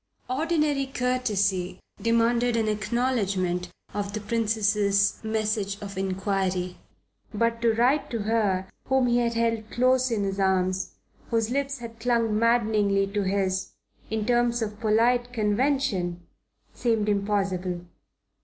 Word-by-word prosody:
Ordinary 300 -1 +1
courtesy 210 -8 0 0.2
demanded 230 +1 +2
an 220 -1 +1
acknowledgment 205 -5 0 0.2
of 200 -1 -3
the 215 - -2
Princess's 210 -2 +1
message 215 -2 -1
of 200 -1 -7
inquiry. 190 -1 -1 0.5
But 230 +2 0
to 230 -1 +3
write 260 +5 +2
to 230 -3 -3
her 205 -4 +1 0.2
whom 265 -1 +2
he 240 0 +3
had 235 -1 0
held 230 -1 0
close 255 +1 +2
in 220 -3 0
his 195 0 -2
arms, 185 -1 0 0.3
whose 230 -1 0
lips 275 +1 -1
had 230 -2 -9
clung 230 -2 +1
maddeningly 215 -4 +2
to 205 - +1
his, 190 -1 -1 0.4
in 220 -1 -1
terms 240 0 +2
of 210 -1 -5
polite 240 +3 +2
convention 210 -6 0 0.5
seemed 225 -3 0
impossible. 195 -3 0
220 Hz, 125 wpm, -26 LUFS, 200-240 Hz, 0.5 s, to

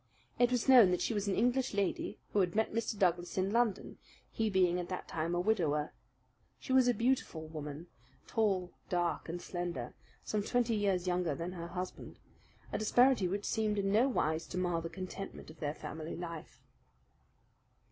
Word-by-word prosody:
It 245 -1 +5
was 250 0 0
known 245 -7 +8
that 180 - +1
she - - 0
was 205 -1 -1
an 195 - +1
English 245 +1 +1
lady 200 -2 -1 0.2
who 205 - +3
had 180 -2 +1
met 220 0 +1
Mr. 230 -1 -1
Douglas 175 -2 +1
in 190 +1 +1
London, 230 -3 0 0.3
he 220 -1 0
being 180 -2 +3
at 175 - -5
that 185 - -4
time 165 +2 -2
a - - +1
widower. 165 -7 +1 0.7
She 260 - -3
was 260 -1 +6
a 245 - +4
beautiful 235 -10 0
woman, 155 0 -6 0.4
tall, 195 -5 0 0.2
dark, 175 -2 -1
and 175 +2 -3
slender, 175 -10 -4 0.3
some 210 - -1
twenty 240 +2 +1
years 195 -4 +1
younger 175 -4 0
than 170 +3 -4
her 170 -2 -6
husband; 180 +1 -6 0.5
a - - -1
disparity 245 -1 +4
which 200 +3 -3
seemed 215 -1 0
in 195 -1 +1
no 235 +6 +4
wise 160 - 0
to 180 - -5
mar 175 -2 0
the 165 - -5
contentment 185 -1 -7
of 155 - -17
their 150 0 -2
family 155 +1 -6
life. 170 -2 -8
185 Hz, 180 wpm, -33 LUFS, 170-220 Hz, 0.7 s, known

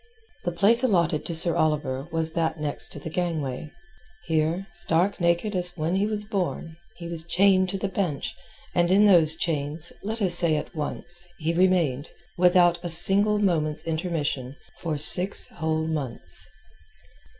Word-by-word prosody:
The 175 - -1
place 210 +7 +5
allotted 170 -10 0
to 170 - -4
Sir 165 +1 +3
Oliver 150 -4 -2
was 160 0 -1
that 165 -1 -2
next 145 0 -3
the 140 - -10
gangway. 155 -5 -4 0.6
Here, 160 +3 -2
stark 175 +3 +5
naked 170 +4 -1
as 180 0 +1
when 160 +2 -3
he 195 +2 0
was 210 -1 -3
born, 185 -6 -5 0.2
he 170 - -9
was 165 -1 -5
chained 185 +2 +1
to 195 - -3
the 195 - -4
bench, 180 -7 -4 0.4
and 175 0 0
in 205 +2 +4
those 165 -6 +3
chains, 155 -1 -4
let 220 +3 -5
us 190 -5 +8
say 170 -3 +4
at 150 - -6
once, 175 +3 -2
he 165 +1 -3
remained, 170 -6 0 0.3
without 175 -1 +3
a 175 - -5
single 200 +5 +5
moment's 160 -7 -1
intermission, 155 -6 -4 0.2
for 160 -3 -4
six 180 +6 +3
whole 160 0 -3
months. 145 -7 -6
170 Hz, 155 wpm, -24 LUFS, 155-185 Hz, 0.6 s, us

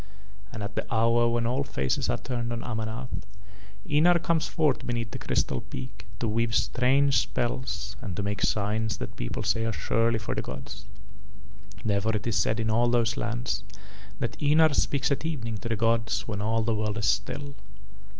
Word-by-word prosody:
And 110 - -5
at 100 0 -5
the - - -4
hour 115 +1 +4
when 115 0 +1
all 125 +4 +1
faces 65 - -1
are - - +1
turned 120 -2 -3
on 115 -1 -3
Amanath, 110 +2 -4 0.7
Ynar 165 +4 +5
comes 165 -2 +2
forth 150 -5 +1
beneath 115 -2 -2
the - - -5
Crystal 65 - 0
peak 65 +9 -8
to 115 - 0
weave 110 +1 +1
strange 125 +7 +3
spells 105 -6 -2
and 95 -4 -4
to 100 - -2
make 100 -1 -2
signs 105 0 +1
that - - -6
people - - -3
say 100 +4 +1
are 115 - 0
surely 115 +1 +1
for 105 - -3
the - - -1
gods. 100 +1 -7 1.0
Therefore 105 +1 +1
it 105 - -2
is 115 -3 0
said 110 +4 +2
in 110 0 +1
all 120 +2 +3
those 120 -1 +2
lands 115 -3 -2 0.5
that 120 - -3
Ynar 155 +1 +5
speaks 140 0 +1
at 140 - 0
evening 115 -10 -3
to 115 - -5
the 115 - +1
gods 115 +1 +1
when 100 -3 -3
all 110 +2 +1
the 115 +1 +1
world 105 0 -1
is 105 - 0
still. 140 +9 0
115 Hz, 185 wpm, -28 LUFS, 105-120 Hz, 1.0 s, Ynar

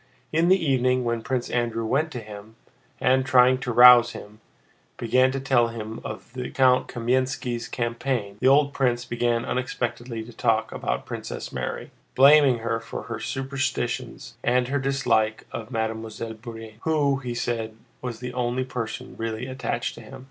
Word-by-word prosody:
In 165 +2 +3
the 190 - +6
evening, 130 -6 +1
when 115 -1 -1
Prince 125 +1 -2
Andrew 115 -2 -1
went 150 +8 +1
to 120 - -5
him 105 +1 -11 0.4
and, 130 +1 +3
trying 130 0 +5
to 125 -1 -3
rouse 120 0 +8
him, 105 +2 -11 0.6
began 130 +3 +3
to 135 - -3
tell 120 -3 +3
him 110 -1 -7
of - - -8
the 125 -1 -5
young - - -7
Count 130 -1 +4
Kámensky's 125 0 -1
campaign, 120 -3 -2
the 130 - +2
old 140 +1 +4
prince 125 -2 0
began 120 0 0
unexpectedly 120 -2 -3
to 115 +1 -12
talk - - +1
about - - -3
Princess - - -6
Mary, - - -5 0.2
blaming 140 -1 +7
her 115 0 0
for 115 - -7
her 115 -1 -6
superstitions 135 -2 -3
and 125 +1 +2
her 140 +1 0
dislike 130 -5 0
of 115 0 -6
Mademoiselle 110 -1 -4
Bourienne, 115 -1 -10
who, 145 -4 +1
he 125 -3 -5
said, 115 -2 -3 0.3
was 125 -2 -6
the 125 0 -5
only 125 +1 -1
person 120 -3 -6
really 115 +1 -3
attached 130 0 -3
to - - -11
him. - - -11
125 Hz, 165 wpm, -25 LUFS, 115-130 Hz, 0.6 s, rouse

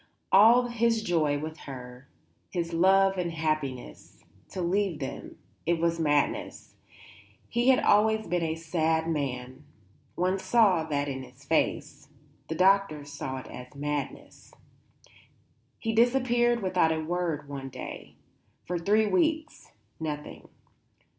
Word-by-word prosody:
All 225 +6 +7
his 235 -2 0
joy 155 -7 +1
with 155 +2 -6
her, 125 0 -9 0.4
his 170 -2 -3
love 190 +2 +4
and 175 -1 -1
happiness 155 - -4 0.3
to 190 - -7
leave 185 0 0
them; 135 -3 -7 0.3
it 170 0 +2
was 170 0 0
madness; 145 -2 -1 0.7
he 240 +1 0
had 260 -1 +6
always 220 +1 +3
been 175 0 -1
a 160 -1 -1
sad 160 0 0
man; 130 -3 -3 0.5
one 185 +2 0
saw 190 -7 +3
that 145 -2 -1
in 135 -1 -4
his 130 +2 -14
face; 145 -1 -1 0.4
the 160 - -3
doctors 185 -5 +2
said 130 0 -5
it - - -12
was 125 +3 -10
madness. 145 -1 -5 1.3
He 225 -1 -2
disappeared 240 -1 +2
without 185 -3 +2
a 160 - -1
word 160 -2 -2
one 135 -1 -6
day. 130 0 -9 0.5
For 175 0 -2
three 210 +5 +3
weeks 315 - -1 0.3
nothing. 150 -2 -6
165 Hz, 125 wpm, -28 LUFS, 145-200 Hz, 1.3 s, All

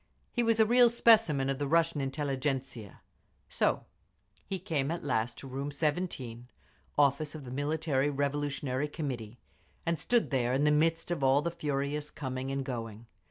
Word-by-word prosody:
He 240 - +1
was 230 -1 +2
a 220 - +7
real 240 +2 +6
specimen 220 - +4
of 135 0 -1
the 145 - -1
Russian 165 -1 +2
intelligentzia…. 135 - -3 0.5
So - - +1 0.6
he 195 - -2
came 160 -7 -1
at 170 +1 -3
last 120 -4 -1
to 135 - -9
Room 135 +2 -4
17, 145 -6 -3 0.5
office 145 +1 +2
of 150 -3 -8
the 125 - -8
Military 145 0 0
Revolutionary 145 -1 -1
Committee, 125 -7 -5 0.5
and 170 -2 0
stood 235 +5 +1
there 125 -2 +1
in 135 +2 +2
the 150 - +4
midst 165 +3 +1
of 160 -5 -1
all 135 +2 +4
the 170 - -1
furious 150 -2 -2
coming 130 -2 -4
and 135 0 -2
going. 115 -3 -5
145 Hz, 160 wpm, -30 LUFS, 130-160 Hz, 0.6 s, a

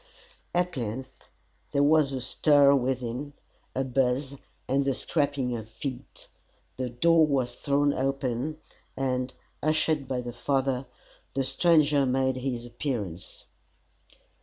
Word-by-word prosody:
At 180 0 +1
length 130 +2 -6 0.4
there 140 - +3
was 150 -1 +4
a 130 -1 -3
stir 140 +3 +5
within, 130 +1 -1 0.4
a 135 - +1
buzz 130 +1 0 0.3
and 135 +2 +2
the 135 -1 0
scraping 140 -5 0
of 110 -1 -7
feet. 130 +3 -7 0.5
The 130 -1 -2
door 160 +6 +4
was 130 -4 0
thrown 145 0 +1
open, 135 +2 -1 0.4
and, 130 -1 -1 0.3
ushered 155 -2 +1
by 130 -1 -1
the 120 -1 -6
father, 135 +1 0 0.5
the 135 - +1
stranger 145 0 +3
made 130 0 +1
his 125 -2 -3
appearance. 115 - -5
135 Hz, 120 wpm, -27 LUFS, 125-145 Hz, 0.5 s, stir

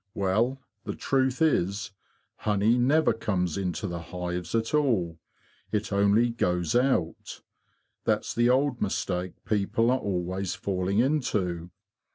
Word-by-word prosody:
'' 100 - -49
Well, 115 +8 +1 0.2
the - - -4
truth 130 +2 +1
is 100 - +1 0.5
honey 105 +2 +2
never 135 +4 +3
comes 90 -7 -1
into 95 0 -2
the 85 -3 -3
hives 90 +1 -4
at 115 +3 0
all; 105 - +1 0.5
it 105 -1 -1
only 100 +4 +3
goes 90 -7 0
out. 125 -10 0 0.6
That's - - 0
the 120 +1 +3
old 130 -1 +2
mistake 95 -2 -1
people 110 +2 +1
are 130 - +2
always 95 -1 -2
falling 95 0 -1
into. 105 - 0
100 Hz, 130 wpm, -27 LUFS, 90-120 Hz, 0.6 s, never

